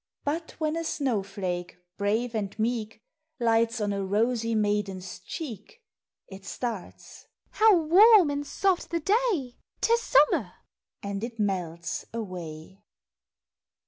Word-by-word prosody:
But 320 Hz, +3 st, -3 dB
when 310 Hz, 0 st, -1 dB
a 330 Hz, -, -2 dB
snow 265 Hz, -9 st, 0 dB
flake, 185 Hz, -3 st, -5 dB, 0.2 s
brave 220 Hz, +4 st, 0 dB
and 210 Hz, -3 st, -3 dB
meek, 225 Hz, -1 st, -2 dB, 0.4 s
Lights 230 Hz, 0 st, +2 dB
on 205 Hz, -1 st, 0 dB
a 200 Hz, 0 st, -2 dB
rosy 230 Hz, +3 st, 0 dB
maiden's 205 Hz, -3 st, -1 dB
cheek, 265 Hz, -, -8 dB, 0.5 s
It 190 Hz, -1 st, -11 dB
starts 225 Hz, -3 st, -6 dB
— -, -, -63 dB
" -, -, -40 dB
How 430 Hz, -3 st, +7 dB
warm 360 Hz, +2 st, +6 dB
and 285 Hz, 0 st, -3 dB
soft 380 Hz, +1 st, 0 dB
the 335 Hz, -, -1 dB
day! 385 Hz, -, 0 dB, 0.2 s
'T 460 Hz, -, +3 dB
is 470 Hz, -, +3 dB
summer! 285 Hz, -, +3 dB, 0.2 s
" -, -, -66 dB
— -, -, -50 dB
and 200 Hz, +1 st, -4 dB
it 235 Hz, -1 st, -5 dB
melts 175 Hz, -5 st, -2 dB
away. 180 Hz, -4 st, -7 dB
225 Hz, 145 wpm, -27 LUFS, 200-305 Hz, 0.5 s, How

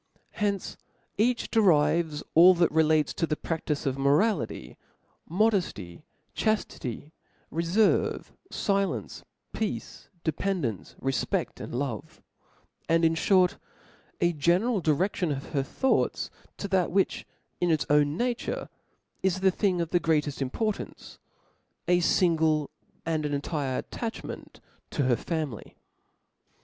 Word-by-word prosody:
From -, -, -18 dB
hence 200 Hz, -2 st, -2 dB, 0.4 s
each 235 Hz, +2 st, +1 dB
derives 165 Hz, -6 st, +3 dB
all 180 Hz, +3 st, +8 dB
that 170 Hz, -1 st, +3 dB
relates 155 Hz, -1 st, +3 dB
to 165 Hz, -, -1 dB
the 155 Hz, -, 0 dB
pradtice 155 Hz, -2 st, -3 dB
of 135 Hz, 0 st, -1 dB
morality, 150 Hz, +11 st, +1 dB, 0.5 s
modefty, 175 Hz, -, 0 dB, 0.3 s
chaftity, 155 Hz, -, -2 dB, 0.4 s
referve^ 170 Hz, +7 st, +1 dB, 0.2 s
filence, 200 Hz, -1 st, -1 dB, 0.3 s
peace, 220 Hz, -2 st, -4 dB
dependence, 160 Hz, -, -2 dB
re 135 Hz, -, 0 dB
fped, 120 Hz, -, -2 dB
and -, -, -6 dB
love 125 Hz, -5 st, -4 dB, 0.4 s
\ -, -, -38 dB
and, 165 Hz, 0 st, +4 dB
in 165 Hz, 0 st, +3 dB
(hort, 180 Hz, +2 st, +3 dB, 0.6 s
a 175 Hz, 0 st, +2 dB
general 180 Hz, +9 st, +2 dB
direction 175 Hz, +3 st, +1 dB
pf 135 Hz, -, -8 dB
her 140 Hz, -, +1 dB
thoughts 265 Hz, -, 0 dB, 0.3 s
to 200 Hz, -, -4 dB
that 185 Hz, -2 st, +2 dB
which 195 Hz, +1 st, 0 dB, 0.3 s
in 175 Hz, -, +1 dB
its 160 Hz, -3 st, +2 dB
own 150 Hz, +1 st, +3 dB
nature 245 Hz, +2 st, -2 dB, 0.5 s
is 190 Hz, -1 st, +1 dB
a 190 Hz, -, +5 dB
thing 185 Hz, -2 st, +1 dB
of 165 Hz, -, -3 dB
the 175 Hz, -, +3 dB
greateft 150 Hz, -3 st, 0 dB
importance, 210 Hz, -, -3 dB, 0.7 s
a 175 Hz, 0 st, +4 dB
fingle 160 Hz, -4 st, +2 dB, 0.3 s
and 160 Hz, -2 st, 0 dB
entire 145 Hz, -2 st, -2 dB
atuchment 230 Hz, -1 st, -7 dB, 0.3 s
to 145 Hz, -, -1 dB
her 130 Hz, -2 st, +3 dB
family. 155 Hz, -, -4 dB
165 Hz, 120 wpm, -27 LUFS, 150-190 Hz, 0.7 s, all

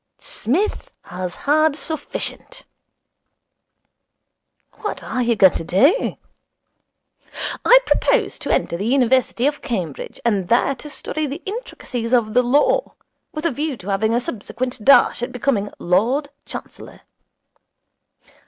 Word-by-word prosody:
"Psmith 330 Hz, -, -2 dB
has 180 Hz, 0 st, -6 dB
had 310 Hz, +1 st, +3 dB
sufficient."' 320 Hz, -, -5 dB, 2.1 s
'What 420 Hz, -, -4 dB
are 255 Hz, -, -2 dB
you 235 Hz, -1 st, +2 dB
going 190 Hz, -3 st, +6 dB
to -, -, -3 dB
do?' 275 Hz, -, +2 dB, 1.5 s
'I -, -, +8 dB
propose -, -, +1 dB
to -, -, -6 dB
enter 170 Hz, -, 0 dB
the 200 Hz, +5 st, -3 dB
University 255 Hz, -1 st, +2 dB
of 290 Hz, 0 st, 0 dB
Cambridge, 185 Hz, -, -4 dB
and 200 Hz, -6 st, +1 dB
there 245 Hz, +3 st, +3 dB
to 295 Hz, +3 st, -10 dB
study 310 Hz, +1 st, -3 dB
the 285 Hz, +6 st, -6 dB
intricacies 255 Hz, -, -5 dB
of 225 Hz, -3 st, +2 dB
the 250 Hz, -, +5 dB
Law, 285 Hz, -, +2 dB, 0.4 s
with 305 Hz, +2 st, -6 dB
a 335 Hz, -, +2 dB
view 290 Hz, +1 st, -3 dB
to 200 Hz, -1 st, -9 dB
having 220 Hz, +3 st, +1 dB
a -, -, +3 dB
subsequent 245 Hz, +1 st, -5 dB
dash 275 Hz, -2 st, +5 dB
at 245 Hz, +1 st, -3 dB
becoming 240 Hz, -5 st, 0 dB
Lord 235 Hz, -, +1 dB, 0.2 s
Chancellor.' -, -, -9 dB
250 Hz, 125 wpm, -20 LUFS, 215-295 Hz, 2.1 s, I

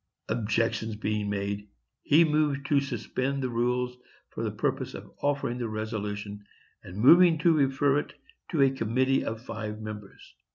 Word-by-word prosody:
Objection 115 Hz, 0 st, 0 dB
being 105 Hz, -1 st, -2 dB
made, 100 Hz, 0 st, -3 dB, 0.3 s
he 155 Hz, +4 st, +5 dB
moved 150 Hz, -3 st, +1 dB
to 140 Hz, 0 st, +3 dB
suspend 140 Hz, 0 st, -2 dB
the 130 Hz, -, -1 dB
rules 125 Hz, +1 st, 0 dB, 0.4 s
for -, -, -5 dB
the -, -, 0 dB
purpose -, -, -2 dB
of -, -, -10 dB
offering 140 Hz, -4 st, -1 dB
the 120 Hz, -2 st, -2 dB
resolution, 105 Hz, -1 st, -4 dB, 0.4 s
and 90 Hz, +2 st, -10 dB
moving 165 Hz, +8 st, +7 dB
to 165 Hz, +2 st, +4 dB
refer 140 Hz, -1 st, +2 dB
it -, -, -6 dB, 0.4 s
to 155 Hz, -6 st, +3 dB
a 135 Hz, -, +4 dB
committee 130 Hz, +2 st, +1 dB
of 110 Hz, +1 st, -5 dB
five 105 Hz, -2 st, -5 dB
members. 105 Hz, -2 st, -9 dB
125 Hz, 155 wpm, -28 LUFS, 105-140 Hz, 0.4 s, moving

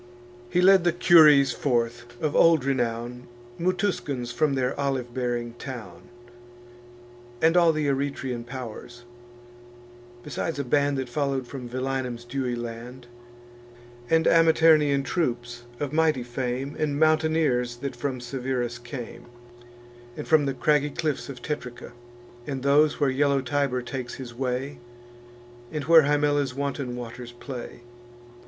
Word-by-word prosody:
He 180 Hz, -, +2 dB
led 190 Hz, 0 st, +6 dB
the 175 Hz, -, +3 dB
Cures 150 Hz, -6 st, +6 dB
forth, 120 Hz, -2 st, -2 dB
of 150 Hz, -2 st, -1 dB
old 165 Hz, -5 st, +5 dB
renown, 120 Hz, -2 st, -2 dB, 0.3 s
Mutuscans 175 Hz, -, -1 dB
from 140 Hz, +3 st, +1 dB
their 130 Hz, -1 st, 0 dB
olive 135 Hz, -4 st, -2 dB
bearing 120 Hz, -2 st, -2 dB
town, 130 Hz, -4 st, -9 dB, 1.3 s
And 165 Hz, +4 st, +3 dB
all 170 Hz, -2 st, +6 dB
th' 155 Hz, -1 st, -1 dB
Eretian 135 Hz, -3 st, -2 dB
pow'rs; 120 Hz, -1 st, -8 dB, 1.2 s
besides 150 Hz, +1 st, -4 dB
a 140 Hz, -, -1 dB
band 140 Hz, +2 st, +1 dB
That 130 Hz, -1 st, -3 dB
follow'd 135 Hz, 0 st, -1 dB
from 125 Hz, -2 st, -7 dB
Velinum's 130 Hz, -1 st, -3 dB
dewy 125 Hz, 0 st, -2 dB
land, 120 Hz, +1 st, -7 dB, 1.0 s
And 160 Hz, 0 st, +3 dB
Amiternian 160 Hz, -4 st, +4 dB
troops, 120 Hz, -7 st, -2 dB
of 145 Hz, -1 st, -3 dB
mighty 155 Hz, -5 st, +2 dB
fame, 125 Hz, +3 st, -4 dB
And 145 Hz, -2 st, -1 dB
mountaineers, 155 Hz, -6 st, +2 dB
that 135 Hz, +3 st, -5 dB
from 135 Hz, -3 st, -3 dB
Severus 125 Hz, -1 st, -3 dB
came, 120 Hz, 0 st, -8 dB, 0.9 s
And -, -, -6 dB
from 155 Hz, -3 st, +4 dB
the 135 Hz, -, -2 dB
craggy 150 Hz, +1 st, +2 dB
cliffs 150 Hz, -1 st, -3 dB
of 125 Hz, -3 st, -9 dB
Tetrica, 125 Hz, -6 st, -6 dB, 0.6 s
And 135 Hz, -3 st, -4 dB
those 145 Hz, +2 st, +3 dB
where 140 Hz, -3 st, +2 dB
yellow 140 Hz, 0 st, +2 dB
Tiber 135 Hz, -2 st, -1 dB
takes 125 Hz, -1 st, -5 dB
his 125 Hz, -3 st, -8 dB
way, 130 Hz, +2 st, -3 dB, 0.9 s
And 150 Hz, -2 st, -3 dB
where 165 Hz, +2 st, +7 dB
Himella's 145 Hz, -2 st, +1 dB
wanton 140 Hz, -2 st, -3 dB
waters 120 Hz, 0 st, -8 dB
play. 120 Hz, -1 st, -8 dB
135 Hz, 130 wpm, -25 LUFS, 125-150 Hz, 1.3 s, where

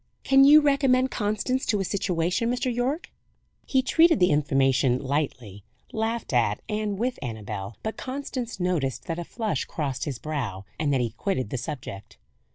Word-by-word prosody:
"Can 270 Hz, 0 st, +6 dB
you 295 Hz, +2 st, +9 dB
recommend 270 Hz, -3 st, +3 dB
Constance 215 Hz, +5 st, -1 dB
to 210 Hz, -, +2 dB
a 195 Hz, -, -1 dB
situation, 185 Hz, +3 st, 0 dB
Mr. 250 Hz, 0 st, -1 dB
Yorke?" 255 Hz, +7 st, -2 dB, 0.6 s
He 265 Hz, -1 st, +2 dB
treated 325 Hz, +1 st, +4 dB
the 180 Hz, -2 st, +4 dB
information 135 Hz, -3 st, +2 dB
lightly; 130 Hz, -8 st, -3 dB, 0.3 s
laughed 225 Hz, -, -2 dB
at 115 Hz, -4 st, +2 dB
and 210 Hz, -2 st, -2 dB
with 245 Hz, +4 st, -1 dB
Annabel; 105 Hz, -4 st, -5 dB
but 220 Hz, -, -3 dB
Constance 255 Hz, -4 st, -5 dB
noticed 170 Hz, -8 st, -1 dB
that 165 Hz, 0 st, -3 dB
a -, -, -3 dB
flush 220 Hz, +4 st, -2 dB
crossed 140 Hz, -6 st, -3 dB
his 140 Hz, -5 st, -3 dB
brow, 115 Hz, -10 st, -4 dB
and 150 Hz, -2 st, +1 dB
that 135 Hz, -2 st, +2 dB
he 120 Hz, -2 st, -1 dB
quitted 130 Hz, -, -2 dB
the 130 Hz, -, -2 dB
subject. 105 Hz, -6 st, -7 dB
180 Hz, 165 wpm, -26 LUFS, -, 0.6 s, you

